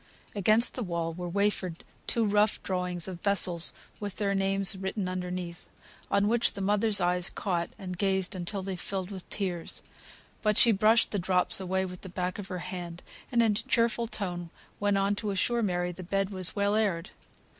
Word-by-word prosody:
Against 215 +3 +4
the 255 - -4
wall 170 -5 -2
were 175 +1 -5
wafered 190 -3 0 0.2
two 230 -1 +2
rough 210 +1 +3
drawings 180 -2 0
of 180 -2 -7
vessels 180 -4 +4 0.3
with 205 -2 -5
their 200 -1 0
names 195 0 +2
written 190 +1 -3
underneath, 180 -1 -5 0.4
on 200 +1 +3
which 235 +2 +2
the - - -7
mother's 205 +2 +3
eyes 180 0 +1
caught, 175 -4 -2
and 180 -2 -6
gazed 190 -1 +1
until 185 +2 -3
they 190 0 -3
filled 190 +1 -4
with 190 -2 -8
tears. 180 -5 -3 0.6
But 215 -1 +2
she 235 - +7
brushed 220 +3 +4
the 205 - 0
drops 180 +1 +3
away 190 0 0
with 180 -1 -8
the 190 - -8
back 180 +1 -3
of 200 - -6
her 185 -2 -4
hand, 175 -2 -6 0.3
and 235 -2 +4
in 225 - +4
a - - +1
cheerful 230 +1 +1
tone 175 -5 -3 0.3
went 205 -1 +2
on 195 +1 +2
to 210 - -2
assure 235 +5 +1
Mary 180 -4 0
the 180 - -9
bed 195 +2 -1
was 185 -2 -2
well 200 0 +2
aired. 195 -5 0
190 Hz, 190 wpm, -29 LUFS, 180-205 Hz, 0.6 s, she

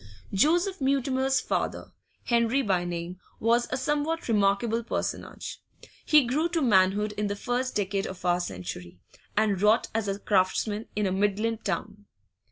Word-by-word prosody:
Joseph 345 - +2
Mutimer's 265 0 +1
father, - - -3 0.3
Henry 235 +3 +2
by 185 -5 +1
name, 175 +1 -5 0.2
was 235 +2 +2
a 260 - -1
somewhat 295 +4 -1
remarkable 220 +2 +2
personage. - - -4 0.4
He 300 -4 +5
grew 300 +8 0
to 335 -1 0
manhood 205 -1 +3
in 210 0 0
the 200 - -2
first 245 +4 -2
decade 195 -1 -1
of 185 -1 -8
our 175 0 +3
century, 90 - -6 0.4
and 205 -3 +2
wrought 215 +3 +3
as 220 -2 -1
a 195 0 -1
craftsman 205 +2 0
in 210 0 0
a 190 - 0
Midland 205 +3 0
town. 205 -1 -4
215 Hz, 150 wpm, -27 LUFS, 195-260 Hz, 0.4 s, He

